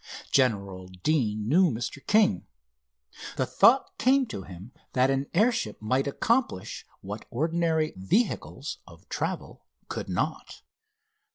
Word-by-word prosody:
General 100 -8 +1
Deane 105 - -1
knew 175 +7 +5
Mr. 120 +2 -4
King. 210 - +3 0.9
The - - +1
thought 260 +3 +4
came 265 +1 +4
to 95 - -5
him 95 +5 -11 0.2
that 130 +1 +3
an 135 +1 0
airship 225 +6 +1
might 130 +6 0
accomplish 230 - -1
what 105 +3 -7
ordinary 160 +3 0
vehicles 95 - -1
of - - -16
travel - - -4 0.2
could - - -5
not." - - -3
135 Hz, 115 wpm, -27 LUFS, 105-175 Hz, 0.9 s, knew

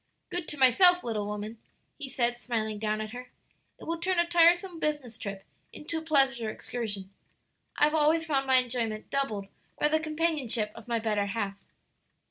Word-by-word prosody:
"Good 355 -2 -3
to 295 - -2
myself, 355 +8 +6
little 215 -3 -2
woman," 210 +2 -6 0.4
he 285 -3 -7
said, 240 -2 +1
smiling 220 -3 -3
down 215 0 -1
at 215 0 -6
her; 250 +1 -9 0.5
"it - - -12
will 335 0 -3
turn 365 +1 0
a 345 - +4
tiresome 345 +1 +3
business 295 -7 -2
trip 200 -2 -6 0.3
into 320 +1 -5
a - - -9
pleasure 270 -7 +3
excursion. 210 -5 -5 0.7
I - - +3
have 300 +1 +4
always 315 +1 +3
found 275 -4 0
my 260 - +4
enjoyment 235 -4 +1
doubled 225 -8 -1 0.3
by 295 - +3
the 315 +1 +2
companionship 305 -9 0
of 230 0 -13
my 235 -1 0
better 210 -2 0
half." 200 -2 -3
250 Hz, 175 wpm, -28 LUFS, 215-310 Hz, 0.7 s, myself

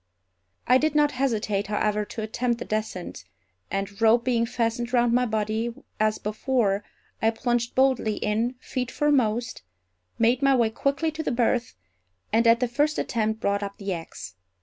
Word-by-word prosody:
I 255 +1 +5
did 310 +2 0
not 295 -1 +4
hesitate, 215 -7 -1
however, 210 0 0
to 220 - -6
attempt 235 +2 -1
the - - -6
descent; 215 - -4 0.5
and 195 0 -1
a 205 - -15
rope 230 +2 +5
being 235 -2 +1
fastened 235 0 -1
round 240 -1 +3
my 250 +1 +3
body 220 +2 -1 0.2
as 215 0 +2
before, 210 -2 0 0.4
I 225 - +4
plunged 240 +1 -1
boldly 260 -5 +2
in, 225 +4 -1
feet 255 -1 -4
foremost, 245 - +1 0.6
made 240 +3 +3
my 275 -1 +4
way 230 -3 +2
quickly 280 +7 0
to 310 +1 -5
the 315 - -2
berth, 240 0 0 0.6
and 230 +1 +4
at 230 +1 +5
the 250 - +2
first 295 +6 0
attempt 220 -1 -1
brought 200 0 0
up 200 0 -5
the 195 -1 -3
axe. 165 - -8
230 Hz, 170 wpm, -25 LUFS, 215-250 Hz, 0.6 s, I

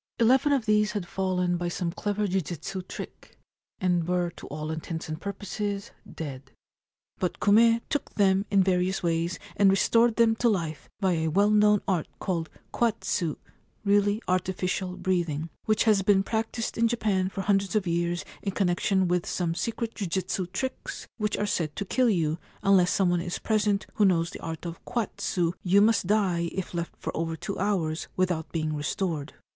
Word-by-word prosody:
Eleven 260 +5 +4
of 270 -5 +2
these 210 -1 +3
had 205 -4 -2
fallen 180 -2 0
by 175 0 -2
some 175 0 -2
clever 205 +3 -1
jujitsu 185 0 -3
trick, - - -9 0.4
and 175 -2 +1
were 180 -1 0
to - - -11
all 155 +1 -4
intents 160 +1 -5
and 155 +1 -5
purposes 200 0 -4 0.2
dead; 135 -4 -7 0.7
but 180 - -2
Kume 230 +3 +5
took 290 - -3
them 195 -1 +3
in 195 -1 +4
various 185 0 +1
ways 170 +1 0 0.2
and 200 -1 +5
restored 230 +4 +4
them 230 -1 +4
to 240 - +3
life 165 -7 -2
by 190 -2 +2
a 160 -2 0
well 200 +6 +3
known 210 -1 +4
art 180 -5 0
called 170 -4 -2 0.2
kwatsu 205 -8 0 0.5
(really 205 +1 +3
artificial 185 0 -1
breathing), 165 -4 -1
which 215 0 +3
has 215 -3 +4
been 195 0 +4
practised 225 +2 -2
in 230 - +5
Japan 210 -5 0
for 195 - -4
hundreds 195 0 +1
of 210 -3 +2
years 170 0 -1 0.2
in 195 - -3
connection 190 0 +1
with 175 0 0
some 170 -2 -1
secret 225 +5 -3
jujitsu 185 -1 -2
tricks 260 +7 -4
which 210 -2 -1
are 210 - 0
said 160 -7 -1
to 200 - -3
kill 250 +5 +2
you 165 -5 +1
— - - -29
unless 190 -3 +5
some 185 -2 +2
one 175 -1 +1
is 175 0 -3
present 210 -2 +1
who 210 - +3
knows 170 -3 +2
the - - -9
art 165 +1 -6
of 170 -1 -6
kwatsu 185 -7 -1
you 195 +2 +4
must 205 -3 +3
die 185 -5 +2
if 190 -1 -4
left 170 -1 -4
for - - -5
over 165 0 -2
two 195 +4 -5
hours 175 -6 0
without 180 -4 0
being 155 -2 -1
restored. 150 0 -2
190 Hz, 175 wpm, -27 LUFS, 170-210 Hz, 0.7 s, Kume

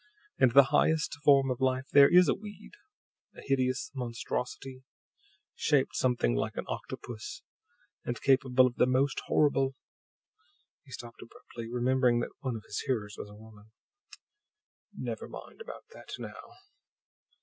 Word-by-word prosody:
"And 125 -3 +4
the 140 +1 +9
highest 160 -1 +2
form 135 -2 +5
of 125 +1 -4
life 130 0 +1
there 140 0 +8
is 180 0 +6
a - - +3
weed; 205 -1 -11 0.6
a - - -11
hideous 130 0 0
monstrosity, 125 +1 -5 0.7
shaped 145 -4 +1
something 125 - +1
like - - -2
an - - -3
octopus, 110 -2 -7 0.6
and 120 - -4
capable 130 -1 +4
of 125 -1 -2
the 125 - +4
most 130 +2 +1
horrible 135 -3 +2 0.5
" 370 -8 -41
He 135 - -17
stopped 120 -1 -9
abruptly, 115 0 -10
remembering 125 0 +2
that - - -4
one 130 -4 -3
of 110 - -7
his 100 - -4
hearers 105 -5 -2
was 105 - -8
a 105 - -13
woman. 110 0 -16 1.2
"Never - - -6
mind - - -11
about 480 +2 -9
that - - -14
now." - - -10
130 Hz, 145 wpm, -30 LUFS, 120-140 Hz, 1.2 s, the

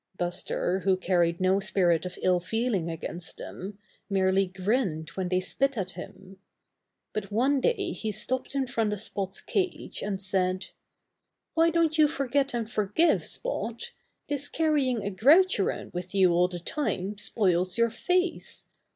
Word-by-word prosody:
Buster, 175 +1 -1
who 190 -1 +2
carried 175 -2 +1
no 185 +1 +3
spirit 180 -4 +2
of 180 - -8
ill 180 -1 +4
feeling 210 -2 -1
against 165 +1 -5
them, 195 +2 -7 0.3
merely 190 0 +2
grinned 185 -4 -1
when 185 -2 -3
they 185 0 +2
spit 270 +8 0
at 190 -2 -2
him. 190 0 -11 0.7
But 210 -1 -4
one 260 +6 +2
day 445 - +1
he 220 - -3
stopped 260 +6 -2
in 270 -1 +1
front 225 -4 0
of 210 - -4
Spot's 195 -2 -4
cage, 375 -2 -2
and 200 -2 -2
said: 185 -1 0 0.8
'Why 330 0 +4
don't 325 -1 +2
you 305 - +7
forget 280 -2 0
and 230 -2 -2
forgive. 215 - +2
Spot? 235 - -4 0.4
This 285 0 -1
carrying 285 -8 +1
a 200 - -2
grouch 300 - +5
around 195 - -2
with 180 +2 -5
you 185 -2 +5
all 175 +1 +4
the 180 -1 -6
time 200 - -2
spoils 185 -4 +1
your 235 -1 +3
face. 360 +9 -1
200 Hz, 155 wpm, -28 LUFS, 185-270 Hz, 0.8 s, you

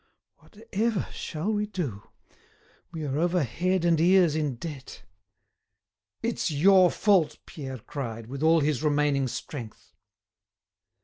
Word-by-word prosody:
Whatever 220 -1 -3
shall 170 +8 -3
we 210 0 -1
do! 150 - -5 0.8
We 160 -3 -5
are 140 +1 -2
over 175 0 +2
head 175 +8 0
and 165 -2 +3
ears 175 -2 +4
in 150 -4 -1
debt." 140 0 -8 1.2
"It's 230 -5 -1
your 180 +4 +5
fault!" 175 -8 +2
Pierre 135 -4 -7
cried, 115 -2 -6
with 135 +4 -7
all 160 +1 +4
his 145 -3 0
remaining 145 -3 +1
strength. 120 -2 -8
155 Hz, 120 wpm, -27 LUFS, 140-185 Hz, 1.2 s, your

